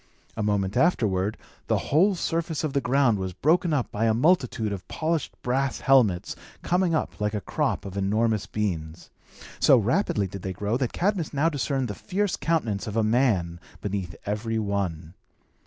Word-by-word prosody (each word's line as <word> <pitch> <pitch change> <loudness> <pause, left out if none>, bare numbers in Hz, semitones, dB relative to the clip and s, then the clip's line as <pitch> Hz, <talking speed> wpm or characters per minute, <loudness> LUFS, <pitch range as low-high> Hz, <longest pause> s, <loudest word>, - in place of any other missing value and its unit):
A 110 - -3
moment 100 -2 0
afterward, 110 - +1 0.3
the - - +2
whole 185 +7 +2
surface 165 -2 -2
of 155 -3 -2
the 140 - +1
ground 130 -5 +2
was 95 -1 -3
broken 165 - +2
up 140 -5 0
by 110 +2 0
a 110 -1 +3
multitude 125 - +2
of 90 -2 -7
polished 160 -2 -2
brass 130 +2 0
helmets, 120 -10 +3 0.3
coming 180 -2 +2
up 155 - -3
like 105 +1 0
a - - 0
crop - - -1
of 95 -1 -7
enormous 105 +2 0
beans. 85 -7 -4 0.5
So - - +6
rapidly 100 - +1
did 95 +1 -7
they 95 0 -4
grow, 105 +4 -2
that 130 -3 -1
Cadmus 180 -5 -1
now 150 +4 +3
discerned 135 -3 -1
the 105 - -4
fierce 200 - -1
countenance 120 -13 -1
of 105 +1 -3
a 110 - +3
man 105 -8 +1 0.2
beneath 95 -4 -4
every 110 +2 -2
one. 95 -6 -2
110 Hz, 170 wpm, -26 LUFS, 100-145 Hz, 0.5 s, So